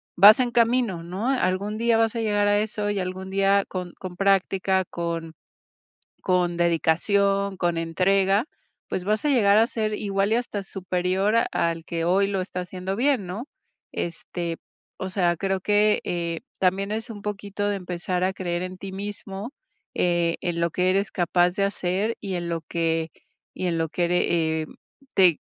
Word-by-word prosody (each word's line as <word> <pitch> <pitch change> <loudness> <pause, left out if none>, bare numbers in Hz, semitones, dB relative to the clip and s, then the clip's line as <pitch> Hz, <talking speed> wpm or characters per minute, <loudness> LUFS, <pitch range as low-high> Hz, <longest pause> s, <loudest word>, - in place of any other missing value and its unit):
vas 205 +6 +9
en 245 -1 +1
camino, 235 -6 +2
¿no?, 185 +7 -4
algún 205 -4 0
día 230 0 +3
vas 225 0 +2
a 230 - -1
llegar 205 -2 +2
a 205 0 +4
eso. 210 -1 -1
Y 205 - -1
algún 185 +1 -4
día, 195 +1 +3
con 180 -2 -5
con 185 -2 -7
práctica, 195 -1 +2
con 170 -2 -4 0.9
con 180 -1 +1
dedicación, 195 +4 +2
con 175 -2 0
entrega, 195 +5 +2 0.4
pues, 180 - -3
vas 215 +5 0
a 295 - +3
llegar 210 -6 +5
a 225 - +5
ser 215 -3 -2
igual, 200 0 0
y - - +4
hasta 235 -4 -3
superior, 190 +1 -1 0.2
al 165 -1 -1
que 165 0 -3
hoy 195 +3 +3
lo 195 -1 -1
está 185 0 -4
haciendo 185 +1 -4
bien, 250 -2 +1
¿no? 210 +10 -6 0.4
Este, 170 0 -4 0.4
o 190 - -3
sea, 180 -2 +1
creo 195 +2 -1
que, 210 +2 +3
eh, 170 -1 -2 0.2
también 195 +2 +1
es 225 +3 -3
un 205 -2 -8
poquito, 205 0 -3
de 205 - 0
empezar 180 -1 -3
a 185 +1 +2
creer 175 -2 -3
en 185 0 -6
ti 195 0 -7
mismo, 200 +2 -6 0.5
eh, 175 -1 +1
en 175 -2 -2
lo 170 0 +1
que 180 +3 +1
eres 195 +1 +1
capaz 175 0 +2
de 200 - +2
hacer, 200 +3 -1
y 195 -3 -4
en 175 -1 -3
lo 165 -1 -2
que 165 -1 0 0.4
y 185 - -3
en 170 -2 0
lo 165 0 0
que 175 +3 -1
ere 165 -2 +1
eh, - - -6 0.5
te 180 -5 +5
190 Hz, 180 wpm, -25 LUFS, 175-205 Hz, 0.9 s, vas